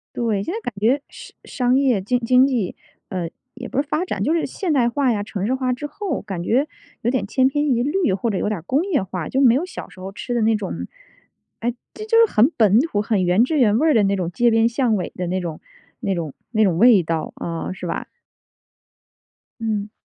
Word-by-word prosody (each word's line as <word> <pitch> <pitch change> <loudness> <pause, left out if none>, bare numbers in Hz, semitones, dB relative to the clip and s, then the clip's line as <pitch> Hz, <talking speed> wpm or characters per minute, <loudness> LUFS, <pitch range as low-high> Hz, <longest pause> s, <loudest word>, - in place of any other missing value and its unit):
对， 215 -4 0
现 345 - -4
在 445 - -3
感 245 - -5
觉 245 +7 +2
商 - - -12 0.4
商 255 - +5
业 260 -7 +2
经 245 +6 0
经 250 +2 +4
济， 240 -9 -1 0.3
呃， 180 -3 -3 0.2
也 - - -8
不 275 - 0
是 290 - -9
发 320 +4 -1
展， 205 - -3
就 305 - +1
是 335 - +1
现 365 -6 -2
代 245 -4 +3
化 265 0 +1
呀， 210 -3 -1
城 200 -2 -4
市 245 - +1
化 255 -1 0
之 250 +4 -6
后， 345 -1 -4
感 190 -4 -5
觉 265 +10 +2 0.3
有 235 - +1
点 250 -6 -1
千 260 +5 +3
篇 290 +2 0
一 240 -2 +2
律 320 - +1
或 200 +5 -1
者 200 - -1
有 - - -1
点 210 -3 -2
儿 - - -15
工 270 - +1
业 350 -9 +1
化。 180 -3 -5
就 265 - +1
没 250 -4 +6
有 285 +8 0
小 365 - -8
时 - - -16
候 190 +1 -6
吃 245 +4 -5
的 240 - +1
那 220 0 +3
种 205 -3 -4 0.7
诶， 240 +1 -2 0.2
这 430 - -7
就 455 +1 +2
是 - - -10
很 220 +6 +5
本 215 -1 +5
土， 260 -8 0
很 210 -3 0
原 180 +6 +4
汁 310 +4 0
原 215 -4 +4
味 315 +6 +2
儿 310 - +4
的 220 - +4
那 200 0 +2
种 180 -2 -2
街 240 +5 +3
边 225 0 +4
巷 235 -1 +1
尾 185 -4 -3
的 180 -1 -3
那 185 +2 -1
种 170 -4 -5 0.4
那 200 -6 -1
种 160 -5 -4 0.2
那 220 -2 +3
种 180 -5 +2
味 225 -2 +6
道， 160 -1 -3
啊， 165 +1 -4
是 185 - -8
吧？ 170 - -4 1.5
嗯。 215 -2 -2
230 Hz, 260 characters per minute, -21 LUFS, 195-265 Hz, 1.5 s, 没